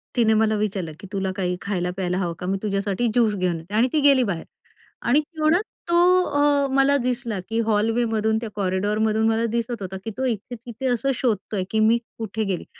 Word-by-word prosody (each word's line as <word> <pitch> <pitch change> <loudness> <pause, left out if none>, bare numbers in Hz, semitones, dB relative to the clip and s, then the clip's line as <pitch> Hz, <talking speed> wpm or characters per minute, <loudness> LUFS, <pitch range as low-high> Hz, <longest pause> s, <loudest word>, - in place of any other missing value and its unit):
तिने 225 -2 +4
मला 220 0 +2
विचारलं, 200 -5 -2
की 195 - -10
तुला 190 -1 -1
काही 180 -2 -1
खायला-प्यायला 180 -1 -2
हवं 175 -3 -1
का 180 - -5
मी 195 +1 0
तुझ्यासाठी 200 +2 0
ज्यूस 220 -3 +3
घेऊन 180 -3 0
येते 175 +6 -13
आणि 235 +4 +4
ती 310 - +3
गेली 275 -3 +5
बाहेर 180 -7 -2 0.6
आणि 275 +5 +5
तेवढच 315 +4 +1 0.3
तो 340 - +3 0.3
अ, 285 -1 +2
मला 275 +1 +4
दिसला, 240 -5 -2
की 225 +1 0
हॉलवेमधून 220 0 +1
त्या 230 - -4
कॉरिडॉरमधून 210 +3 +1
मला 225 +1 +1
दिसत 235 -2 -3
होता, 190 0 -5
की 225 - -3
तो 265 - -1
इथे-तिथे 240 +2 -4
असं 270 +3 +1
शोधतोय, 210 -5 -1
की 220 - +1
मी 220 +2 +4 0.2
कुठे 220 0 -3
गेली? 190 -4 -3
220 Hz, 190 wpm, -23 LUFS, 195-245 Hz, 0.6 s, गेली